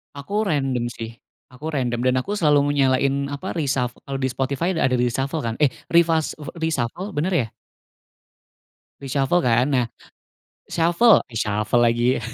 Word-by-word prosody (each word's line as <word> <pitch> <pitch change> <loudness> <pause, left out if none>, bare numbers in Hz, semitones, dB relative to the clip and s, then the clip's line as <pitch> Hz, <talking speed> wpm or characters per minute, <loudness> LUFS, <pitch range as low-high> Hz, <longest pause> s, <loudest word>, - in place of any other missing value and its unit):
Aku 200 +10 -2
random, 135 -7 0
sih, 115 0 -8 0.3
aku 130 +5 -11
random, 120 -4 -1
dan 130 0 +3
aku 200 - -6
selalu 145 -3 +3
nyalain 135 +1 +2
apa, 145 +7 -5
reshuf 135 -5 0
kalau 135 -1 -4
di 130 - +1
Spotify 140 +8 -1
ada 130 -5 +2
reshuffle 135 +5 -1
kan? 115 -1 -2
Eh, 145 -4 +4 0.2
refas 165 -2 +3
eh 150 - -9
reshuffle, 160 - -2
bener 170 +6 0
ya? 130 -9 +1 1.5
Reshuffle 140 +4 +1
kan? 120 +1 +3
Nah, 125 -2 +2 0.8
shuffle 175 +7 +4
reshuffle 105 +1 0
lagi. 120 +2 +2
135 Hz, 140 wpm, -22 LUFS, 125-160 Hz, 1.5 s, Eh